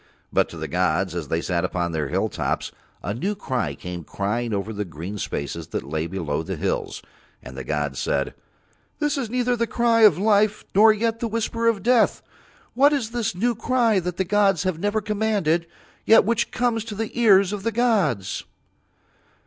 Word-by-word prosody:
But - - +2
to - - -9
the - - -4
gods 90 +1 0
as 85 -4 -4
They 80 +4 -1
sat 85 -2 -1
upon 85 -1 -1
Their 80 -3 -2
hilltops 85 -4 -2 0.3
a 100 - -2
new 195 - -2
cry 125 - -2
came 90 +4 -7
crying 110 +8 -2
over 105 +2 -2
the 105 0 -2
green 90 +4 -7
spaces 80 +1 -4
that - - -4
lay 80 +3 -3
below 80 -5 -2
the 80 - -4
hills, - - -3 0.4
and 65 - -10
the 65 - -6
gods 75 0 -2
said: - - -1 0.6
"This 295 -1 0
is 260 -6 -3
neither 245 +1 +1
the 235 0 -1
cry 230 0 +2
of 210 -7 +7
life 210 +1 +2
nor 220 +3 +7
yet 225 +1 -1
the 235 - -1
whisper 230 +1 -1
of 215 -5 +1
death. 240 -2 +3 0.5
What 280 +4 +5
is 240 -6 -1
this 235 -6 -2
new 240 +6 +1
cry 230 -2 +2
that 180 -1 -4
the 190 - 0
gods 195 -3 +2
have 185 -4 -1
never 205 +3 0
commanded, 200 -6 0 0.4
yet 225 - +6
which 230 +1 +1
comes 240 -3 0
to 215 - -6
the 220 +1 -3
ears 200 -4 +5
of 205 - -4
the 230 +3 -1
gods?" 200 - +1
195 Hz, 190 wpm, -23 LUFS, -, 0.6 s, of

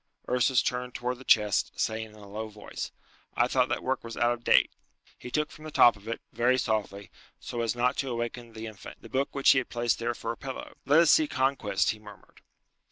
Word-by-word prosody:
Ursus 125 0 +3
turned 125 0 -3
towards 125 +1 -3
the - - -11
chest, 105 -6 +2
saying 110 0 -1
in 110 - -17
a 105 -1 -13
low 110 +2 -5
voice, 105 -1 -7 0.5
"I - - +3
thought - - +2
that - - -2
work - - -1
was 115 0 -8
out 120 0 +3
of 120 0 -9
date." - - +4 0.4
He 125 - -9
took 150 +4 -1
from 155 - -13
the 155 - -6
top 120 -6 +6
of 100 +1 -16
it, 115 - -4
very 125 +2 +3
softly, 105 -4 -2 0.3
so 120 - -4
as 115 -1 0
not 125 +1 +1
to 135 - -1
awaken 120 0 -4
the 110 0 -7
infant, 110 -3 -10
the - - -11
book 135 +2 -1
which 140 - +6
he 130 - +5
had 130 - -6
placed 120 0 0
there 120 +1 -1
for 115 - -4
a 115 - -7
pillow. 135 -1 -7
"Let 150 +4 +6
us 170 - +5
see 315 -1 +5
Conquest," 130 - +1
he 110 - -8
murmured. 105 -1 -15
120 Hz, 230 wpm, -28 LUFS, 110-130 Hz, 0.5 s, top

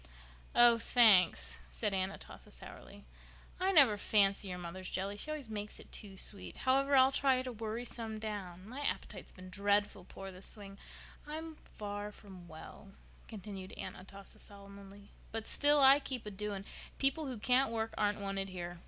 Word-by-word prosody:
"Oh, 240 -1 +8
thanks," 180 - +5
said 130 - -2
Aunt 190 0 0
Atossa - - -12
sourly. - - -10 0.5
"I 375 +1 +2
never 275 - +7
fancy 200 -1 +2
your 180 -1 -4
mother's 180 +1 -7
jelly—she 200 +8 -4
always 305 -5 -3
makes 210 -1 -6
it - - -15
too 195 -2 -7
sweet. 200 +1 0
However, 275 +2 +3
I'll 260 0 +6
try 265 -2 +2
to 255 - -4
worry 225 +1 -4
some 225 -2 -5
down. 200 -4 -6
My 255 +5 -7
appetite's 290 - -3
been 185 0 -12
dreadful 205 -1 +1
poor 195 +1 -9
this 185 +1 -8
spring. 200 -2 -7 0.5
I'm 315 +1 -6 0.2
far 205 0 -5
from 190 -4 -13
well," 170 +4 -12 0.3
continued 195 -3 -8
Aunt 185 - -6
Atossa 195 +1 -11
solemnly, 200 0 -11 0.2
"but 225 0 -4
still 290 0 +5
I 270 +1 +8
keep 260 -5 -5
a 210 - -5
doing. 200 0 -5 0.3
People 275 +3 +2
who 255 -3 -4
can't 250 +4 +3
work 225 0 -2
aren't 205 0 0
wanted 195 -1 -3
here. 175 -1 -6
205 Hz, 165 wpm, -34 LUFS, 195-245 Hz, 0.5 s, Oh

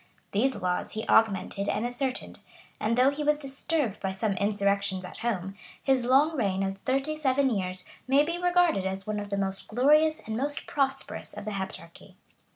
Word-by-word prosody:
These 255 +6 +2
laws 180 0 -1
he 220 - -4
augmented 200 -2 +2
and 220 - 0
ascertained; 255 +2 -3 0.4
and 225 +2 0
though 255 +2 +5
he 295 +1 -4
was 300 0 +3
disturbed 275 -4 -2
by 190 -1 -2
some 205 +1 -1
insurrections 200 -2 +1
at - - -9
home, 195 -5 -2 0.3
his 265 -3 +2
long 280 +6 +4
reign 195 -7 0
of 195 0 -3
thirty 275 +4 0
seven 275 -2 +2
years 185 -3 -2 0.2
may 275 +2 +5
be 340 +3 -2
regarded 350 - +3
as 190 0 -4
one 215 -1 -2
of 205 0 -6
the 200 - -1
most 195 0 -2
glorious 300 +7 +4
and 220 - -5
most 285 +5 -2
prosperous 270 -1 -2
of - - -6
the 215 - -3
Heptarchy. 190 -4 -7
230 Hz, 180 wpm, -28 LUFS, 195-275 Hz, 0.4 s, though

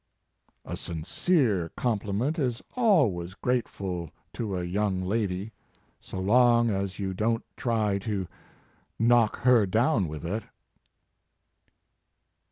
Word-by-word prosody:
"A - - -4
sincere 95 - 0
compliment 115 - -1
is 125 -4 -1
always 130 - +2
grate 125 +2 0
ful 90 -4 -5 0.2
to 105 -5 -3
a 90 - -2
young 95 +2 0
lady, 100 0 -1 0.6
so - - -6
long 120 +3 +4
as 95 -2 -2
you 95 -2 -2
don 115 +4 0
t - - -39
try 110 -5 0
to 100 -3 -3 0.7
knock 115 -1 +4
her 120 -5 +5
down 110 - +2
with 75 +1 -7
it." 105 +7 -2
105 Hz, 115 wpm, -27 LUFS, 95-120 Hz, 0.7 s, her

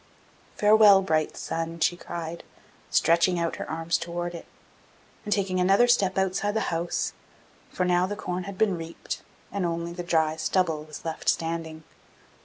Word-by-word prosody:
'Farewell, 210 -2 +6
bright 155 -4 0
sun!' 165 0 -4
she 175 - +2
cried, 170 -1 -6 0.5
stretching 170 +2 +3
out 170 -1 -1
her - - -6
arms 165 +1 -1
towards 175 +1 -4
it, 170 - -9 0.8
and 210 - -6
taking 190 -3 +1
another 195 +6 +4
step 200 -6 +2
outside 190 +2 0
the 220 - -1
house; 170 +1 -1 0.6
for 180 - -1
now 180 0 +2
the 205 - -4
corn 180 -3 -4
had 195 -1 -7
been 205 -3 +2
reaped, 165 0 -6 0.3
and 200 -1 -2
only 170 0 -2
the 175 - -5
dry 160 -3 +1
stubble 160 -1 0
was 155 +1 -10
left 160 -1 -2
standing. 165 -1 -2
175 Hz, 160 wpm, -26 LUFS, 165-190 Hz, 0.8 s, Farewell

